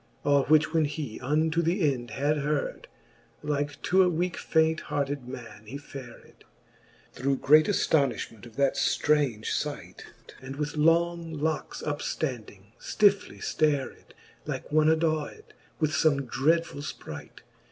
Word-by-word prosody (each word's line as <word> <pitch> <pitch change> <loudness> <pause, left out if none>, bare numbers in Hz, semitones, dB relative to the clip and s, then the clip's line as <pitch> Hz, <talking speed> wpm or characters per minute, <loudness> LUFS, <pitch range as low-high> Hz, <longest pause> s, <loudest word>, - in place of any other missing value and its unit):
All 140 -1 +4
which 155 +1 +4
when 160 -2 +3
he 145 -6 -5
unto 155 +5 +1
the 165 -3 +2
end 120 -2 -8
had 145 +6 0
heard, 145 0 -2 0.6
Like 145 0 -2
to 190 +1 +4
a 180 - +4
weake 175 +1 -1
faint 160 0 +2
hearted 140 -2 -3
man 115 -5 -9
he 135 +6 -6
fared. 135 -4 -12 0.7
Through 135 +2 0
great 155 +4 +5
aftonifhment 135 - 0
of 115 - -16
that 140 -1 +1
ftraunge 140 -8 +1
fight - - -7 0.2
\ - - -17
And 130 +1 -7
with 150 +1 -3
long 165 +1 +2
locks 155 0 -3
up 145 -1 -2
ftanding, 110 -8 -5
ftifly 205 -2 +1
flared 145 -4 -1 0.3
Like - - -5
one 155 0 +4
adawcd 160 -1 0 0.4
with 155 -1 +1
fome 140 -1 +2
dreadfuU 155 +4 +1 0.2
fpright. - - -10
150 Hz, 140 wpm, -27 LUFS, 135-160 Hz, 0.7 s, great